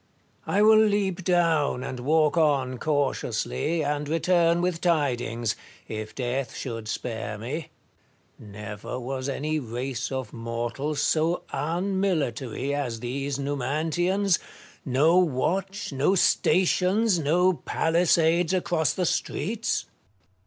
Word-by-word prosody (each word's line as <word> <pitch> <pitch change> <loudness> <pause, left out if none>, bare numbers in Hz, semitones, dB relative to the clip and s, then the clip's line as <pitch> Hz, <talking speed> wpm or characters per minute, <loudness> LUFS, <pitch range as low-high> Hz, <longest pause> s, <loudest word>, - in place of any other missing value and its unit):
I 205 +2 +3
will 220 0 +7
leap 200 -3 0
down 165 -7 +2
and 130 -1 -5
walk 155 +4 +2
on 140 -6 +2
cautiously, 145 - -1
and 145 0 -2
return 170 +1 +3
with 175 -1 -1
tidings, 120 -9 0 0.3
if 110 0 -6
death 125 0 -2
should 115 -3 -5
spare 110 -2 -4
me. 135 +9 -5 0.7
Never 105 +3 -7
was 130 +2 -4
any 155 +3 -1
race 125 0 -4
of 130 -5 -4
mortals 120 +6 -3
so 165 +2 +1
unmilitary 160 - -1
as 125 -6 -2
these 135 +3 -3
Numantians; 160 +8 0 0.4
no 150 +6 +3
watch, 185 +4 -1
no 145 +8 +2
stations, 185 +4 +3
no 175 +5 +3
palisades 165 +1 +2
across 170 -3 +1
the 180 - -1
streets. 215 +7 -1
Metellus. 95 -2 -38
150 Hz, 110 wpm, -26 LUFS, 125-175 Hz, 0.7 s, will